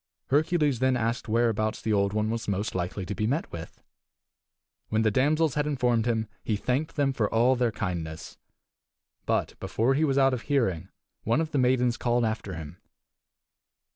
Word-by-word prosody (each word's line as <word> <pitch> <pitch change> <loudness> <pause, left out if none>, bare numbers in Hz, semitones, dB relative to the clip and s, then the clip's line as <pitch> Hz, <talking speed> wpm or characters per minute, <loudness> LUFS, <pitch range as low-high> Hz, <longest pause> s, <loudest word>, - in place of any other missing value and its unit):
Hercules 150 -2 +2
then 130 -1 +2
asked 115 0 -2
whereabouts 110 -1 +1
the 110 - -1
Old 100 -1 +2
One 105 +1 0
was 115 0 -3
most 100 +1 -1
likely 95 +1 -3
to 100 - -4
be 105 0 -1
met 145 +7 -1
with. 85 0 -9 1.1
When 110 +1 +1
the 110 - +3
damsels 150 +5 +2
had 150 0 0
informed 125 -5 +1
him 110 -2 0 0.2
he 110 - 0
thanked 130 +8 -1
them 140 -2 +1
for 110 -5 0
all 120 +3 +4
their 120 -2 +1
kindness. 85 -5 -5 0.9
But - - -1
before 120 +5 +1
he 145 +4 +1
was 140 -3 +1
out 135 -1 +4
of 125 - -2
hearing 95 - 0 0.3
one 115 +6 +1
of 160 -1 -2
the 145 - +1
maidens 125 -1 +2
called 120 -1 +1
after 110 -4 -3
him. 80 -3 -8
115 Hz, 175 wpm, -27 LUFS, 105-135 Hz, 1.1 s, all